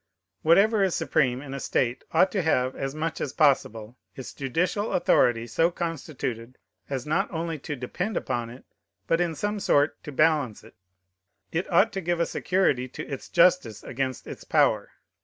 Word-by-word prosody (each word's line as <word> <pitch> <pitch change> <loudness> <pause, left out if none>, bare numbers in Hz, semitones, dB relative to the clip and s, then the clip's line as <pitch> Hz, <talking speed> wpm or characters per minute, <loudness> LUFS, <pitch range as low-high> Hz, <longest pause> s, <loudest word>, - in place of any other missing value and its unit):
Whatever 200 +7 +4
is 190 -3 +2
supreme 130 -4 +1
in 135 -2 -8
a 140 - -4
state 125 -1 -1
ought 190 - +4
to 195 - 0
have, 130 -6 +1
as 135 +1 -4
much 160 0 -3
as 135 - -3
possible, 125 -6 +1 0.2
ifs 130 - -8
judicial 175 - -1
authority 120 -8 +3
so 165 +7 +2
constituted 135 -8 -5 0.3
as 135 -3 -3
not 175 +6 0
only 165 -1 -3
not 140 - -21
to 150 - -3
depend 180 - -3
upon 120 -3 -2
it, 125 +3 -13 0.4
but 165 +1 +1
in 170 -2 -1
some 205 +5 -2
sort 145 -5 +2
to 150 - -7
balance 145 -6 +1
it. - - -16 0.8
It 175 +4 -2
ought 170 - +4
to 195 - -3
give 175 0 -1
a 170 - +2
security 155 -12 0
to 130 - -8
its 135 -2 -7
justice 170 - +3
against 130 0 -3
its - - -9
power. - - +2
150 Hz, 175 wpm, -26 LUFS, 130-175 Hz, 0.8 s, Whatever